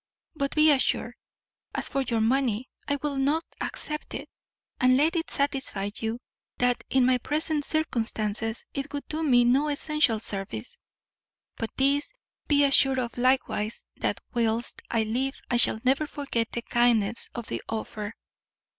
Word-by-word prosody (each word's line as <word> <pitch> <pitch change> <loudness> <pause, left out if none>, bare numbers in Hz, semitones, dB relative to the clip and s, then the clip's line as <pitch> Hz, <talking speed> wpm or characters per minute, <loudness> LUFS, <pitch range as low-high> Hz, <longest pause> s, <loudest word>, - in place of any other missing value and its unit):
But, 280 -2 -2
be 305 0 +6
assured, 275 -2 +1 0.6
as - - 0
for 275 - -1
your 235 -4 0
money, 245 0 +1 0.2
I 285 - +2
will 290 -2 -1
not 290 +5 +1 0.2
accept 300 0 -4
it; - - -5 0.5
and 255 0 +5
let 315 +5 +3
it 325 -1 -1
satisfy 265 -8 -1
you, 225 +1 -2 0.4
that 245 0 +1
in 260 -1 +4
my 255 0 +3
present 300 +2 0
circumstances 225 -7 -1
it 275 +1 -4
would 285 - -4
do 315 +1 -2
me 245 -6 +5
no 265 +5 +3
essential 290 -5 +2
service; 195 - -4 0.8
but 225 - -3
this 280 +2 +2 0.4
be 290 -1 +4
assured 270 -1 +5
of 245 -2 -2
likewise, 250 -4 0
that - - -1
whilst 230 -1 0
I 230 -1 +1
live 255 +5 -1
I 240 - +3
shall 230 -2 +4
never 270 +4 +2
forget 270 -6 -2
the 235 - -3
kindness 235 -3 +2
of 235 - -4
the 115 - -4
offer. 215 -1 -4
255 Hz, 155 wpm, -27 LUFS, 230-285 Hz, 0.8 s, be